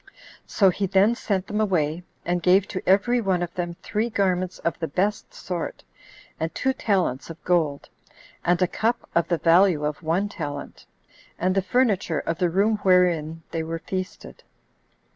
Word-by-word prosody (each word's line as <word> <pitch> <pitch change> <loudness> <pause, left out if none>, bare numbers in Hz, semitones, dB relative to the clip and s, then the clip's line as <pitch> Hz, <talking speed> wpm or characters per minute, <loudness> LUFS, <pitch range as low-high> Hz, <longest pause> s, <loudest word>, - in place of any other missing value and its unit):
So 195 -3 +4
he 195 +2 -2
then 195 +4 +4
sent 200 -6 -2
them 210 +2 -2
away, 170 -5 0 0.2
and 175 0 0
gave 185 +3 +4
to 185 - -4
every 235 +6 +3
one 185 -4 +1
of 170 -1 -5
them 175 -1 -3
three 225 +2 -1
garments 185 -3 0
of 170 -3 -3
the 165 - -2
best 200 +8 -1
sort, 175 -3 -5 0.6
and 160 +1 -2
two 265 - +1
talents 185 - 0
of 165 0 -10
gold, 160 -6 0 0.6
and 175 0 +2
a - - +3
cup 230 +6 -1
of 170 0 +2
the 170 - +1
value 170 -2 +4
of 150 +2 -3
one 170 +5 0
talent, 145 -8 -7 0.5
and 185 +1 +1
the 195 - +2
furniture 195 -6 +1
of 165 +1 -2
the 180 -2 +2
room 205 +5 +2
wherein 175 -5 +2
they 165 - -2
were 165 +1 -4
feasted. 185 +3 -6
180 Hz, 170 wpm, -24 LUFS, 165-200 Hz, 0.6 s, So